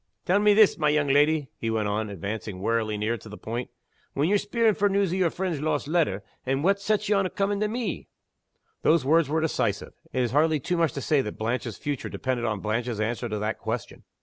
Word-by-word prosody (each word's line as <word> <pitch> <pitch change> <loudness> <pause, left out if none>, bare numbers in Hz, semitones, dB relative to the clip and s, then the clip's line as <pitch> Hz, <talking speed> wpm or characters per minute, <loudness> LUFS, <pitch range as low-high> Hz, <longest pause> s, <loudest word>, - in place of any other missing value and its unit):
"Tell 185 +3 +3
me 210 0 +5
this, 215 -4 +5
my 150 -1 +3
young 150 -1 +2
leddy," 145 +1 +3
he 115 - -2
went 110 -2 0
on, 105 +1 -1
advancing 100 +1 -5
warily 110 +1 0
near 110 +2 -1
to 110 - -12
the 105 - -9
point. 120 +3 -5 0.5
"When 145 +3 +2
ye're 205 0 +3
speering 220 +2 +2
for 205 0 +2
news 195 -2 +1
o' - - 0
your 185 -3 +2
friend's 175 -4 -3
lost 150 -2 -1
letter 150 - +1 0.2
what 155 +10 +1
sets 210 +1 0
ye 210 - +3
on 195 -2 +2
comin' 200 +1 -1
to 215 - +1
me?" 225 -3 -3 0.7
Those 160 -3 +3
words 160 0 +3
were 160 +1 +1
decisive. 115 -10 -1 0.2
It 130 - 0
is 120 - -1
hardly 155 +2 +3
too 175 +7 -2
much 165 -2 +2
to 140 - -4
say 145 +1 +2
that 105 - -6
Blanche's 115 0 -2
future 145 -3 -4
depended 125 -2 -2
on 105 -3 -2
Blanche's 115 +1 -2
answer 120 +2 -2
to 105 - -2
that 105 +1 -2
question. 115 0 -4
145 Hz, 225 wpm, -26 LUFS, 110-180 Hz, 0.7 s, me